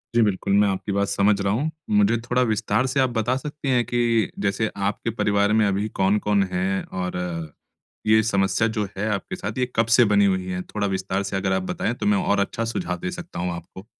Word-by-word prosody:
जी 120 Hz, -, +5 dB
बिल्कुल। 100 Hz, -2 st, +1 dB
मैं 100 Hz, +1 st, +5 dB
आपकी 95 Hz, +1 st, -3 dB
बात 100 Hz, 0 st, +1 dB
समझ 100 Hz, 0 st, +2 dB
रहा 100 Hz, 0 st, +1 dB
हूँ। 145 Hz, +8 st, -1 dB, 0.2 s
मुझे 105 Hz, +2 st, +3 dB
थोड़ा 125 Hz, +1 st, 0 dB
विस्तार 110 Hz, +3 st, +1 dB
से 130 Hz, +2 st, 0 dB
आप 130 Hz, -1 st, +3 dB
बता 120 Hz, +1 st, 0 dB
सकती 150 Hz, 0 st, -5 dB
हैं 125 Hz, -2 st, +3 dB
कि 120 Hz, -2 st, +1 dB
जैसे 100 Hz, +2 st, 0 dB, 0.2 s
आपके 105 Hz, -, -4 dB
परिवार 105 Hz, -1 st, +1 dB
में 110 Hz, -1 st, +4 dB
अभी 100 Hz, +2 st, 0 dB
कौन-कौन 100 Hz, +1 st, +2 dB
है 95 Hz, +1 st, -1 dB
और 90 Hz, -1 st, -4 dB, 0.9 s
ये 110 Hz, 0 st, +6 dB
समस्या 100 Hz, 0 st, +1 dB
जो 105 Hz, -, +1 dB
है 105 Hz, +2 st, -1 dB
आपके 100 Hz, -, -4 dB
साथ 105 Hz, +4 st, -5 dB
ये 125 Hz, -, +2 dB
कब 115 Hz, -, +3 dB
से 120 Hz, -, +7 dB
बनी 100 Hz, -1 st, +4 dB
हुई 95 Hz, -2 st, +1 dB
है? 90 Hz, 0 st, -3 dB
थोड़ा 105 Hz, +2 st, -3 dB
विस्तार 95 Hz, 0 st, -2 dB
से 100 Hz, -, -4 dB
अगर 95 Hz, 0 st, 0 dB
आप 95 Hz, 0 st, 0 dB
बताएँ 115 Hz, -, -1 dB
तो 125 Hz, -, -5 dB
मैं 205 Hz, 0 st, +3 dB
और 105 Hz, -, +1 dB
अच्छा 110 Hz, +3 st, -1 dB
सुझाव 140 Hz, +11 st, -3 dB
दे 180 Hz, +1 st, -3 dB
सकता 175 Hz, -, -7 dB
हूँ 90 Hz, 0 st, -1 dB
आपको। 90 Hz, +4 st, -11 dB
105 Hz, 225 wpm, -23 LUFS, 100-115 Hz, 0.9 s, से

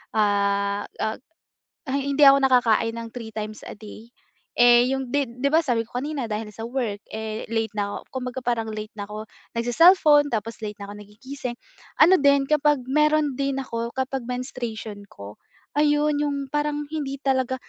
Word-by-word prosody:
ah, 200 Hz, -1 st, +1 dB, 0.2 s
ah 220 Hz, 0 st, -1 dB, 0.8 s
hindi 280 Hz, +1 st, 0 dB
ako 275 Hz, 0 st, +8 dB
nakakain 230 Hz, -3 st, +3 dB
ng 230 Hz, 0 st, -6 dB
3 230 Hz, -3 st, -7 dB
times 215 Hz, 0 st, -6 dB
a -, -, -7 dB
day, 220 Hz, +2 st, -12 dB, 0.5 s
eh, 240 Hz, +1 st, +6 dB
yung 265 Hz, -1 st, -1 dB
'di 250 Hz, -2 st, -2 dB
'di 280 Hz, +2 st, +1 dB
ba 330 Hz, -, +5 dB
sabi 235 Hz, -6 st, 0 dB
ko 245 Hz, -, -5 dB
kanina 290 Hz, -4 st, -3 dB
dahil 215 Hz, 0 st, -4 dB
sa 225 Hz, +2 st, -6 dB
work. 235 Hz, -5 st, -2 dB, 0.2 s
eh, 220 Hz, 0 st, -5 dB
late 225 Hz, -1 st, -1 dB
na 205 Hz, 0 st, -1 dB
ako, -, -, -4 dB
kumbaga 255 Hz, 0 st, -4 dB
parang 235 Hz, -2 st, -1 dB
late 215 Hz, 0 st, -6 dB
na 200 Hz, -, -4 dB
ako 210 Hz, +1 st, -7 dB, 0.3 s
nag-ce-cellphone 295 Hz, +5 st, +5 dB
tapos 225 Hz, +1 st, -3 dB
late 210 Hz, -1 st, -5 dB
na 200 Hz, -, -7 dB
ako 205 Hz, -, -9 dB
nagigising, 240 Hz, +5 st, -7 dB, 0.5 s
ano 365 Hz, +4 st, +7 dB
din 280 Hz, -1 st, +4 dB
kapag 295 Hz, -2 st, +3 dB
meron 300 Hz, -1 st, +2 dB
din 275 Hz, -1 st, -1 dB
ako, 235 Hz, -1 st, -5 dB
kapag 265 Hz, -1 st, -3 dB
menstruation 230 Hz, -4 st, -5 dB
ko. 100 Hz, -, -12 dB, 0.4 s
Ayun 295 Hz, 0 st, +3 dB
yung 290 Hz, -1 st, -1 dB
parang 295 Hz, 0 st, -1 dB
hindi 290 Hz, -3 st, -3 dB
talaga 260 Hz, -1 st, +1 dB
245 Hz, 170 wpm, -24 LUFS, 220-280 Hz, 0.8 s, ako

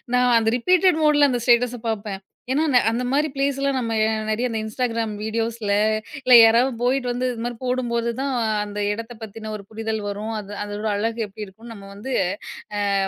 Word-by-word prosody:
நான் 250 Hz, -1 st, +4 dB
அந்த 225 Hz, -1 st, +2 dB
ரிப்பீட்டட் 360 Hz, +4 st, +3 dB
மோடுல 295 Hz, -1 st, +5 dB
அந்த 245 Hz, -, -1 dB
ஸ்டேட்டஸ 245 Hz, 0 st, +3 dB
பார்ப்பேன். 205 Hz, -3 st, -4 dB, 0.3 s
ஏன்னா 290 Hz, +4 st, +2 dB
ந 250 Hz, -, +5 dB
அந்த 235 Hz, +2 st, -1 dB
மாதிரி 295 Hz, +3 st, +2 dB
ப்ளேஸ்லாம் 275 Hz, 0 st, 0 dB
நம்ம 230 Hz, -2 st, -2 dB, 0.4 s
நெறைய 235 Hz, +4 st, 0 dB
இந்த 225 Hz, -1 st, -2 dB
Instagram 230 Hz, 0 st, -2 dB
வீடியோஸ்ல 225 Hz, -1 st, -2 dB, 0.5 s
இல்ல 255 Hz, -1 st, +4 dB
யாராவது 240 Hz, +4 st, +4 dB
போயிட்டு 250 Hz, +1 st, +1 dB
வந்து 250 Hz, +1 st, -1 dB
இதுமாதிரி 240 Hz, 0 st, -4 dB
போடும்போதுதான் 250 Hz, +1 st, -1 dB, 0.3 s
அந்த 205 Hz, 0 st, -6 dB
எடத்த 230 Hz, +3 st, -7 dB
பத்தின 220 Hz, 0 st, -7 dB
ஒரு 200 Hz, -, -12 dB
புரிதல் 220 Hz, 0 st, -3 dB
வரும். 210 Hz, +2 st, -4 dB
அது 205 Hz, -1 st, -9 dB
அதோட 205 Hz, +1 st, -4 dB
அழகு 225 Hz, +3 st, -2 dB
எப்படி 210 Hz, +1 st, -8 dB
இருக்கும் 225 Hz, +5 st, -13 dB
நம்ம 200 Hz, -2 st, -12 dB
வந்து 210 Hz, +7 st, -7 dB, 0.8 s
அ -, -, +1 dB
230 Hz, 170 wpm, -22 LUFS, 220-255 Hz, 0.8 s, மோடுல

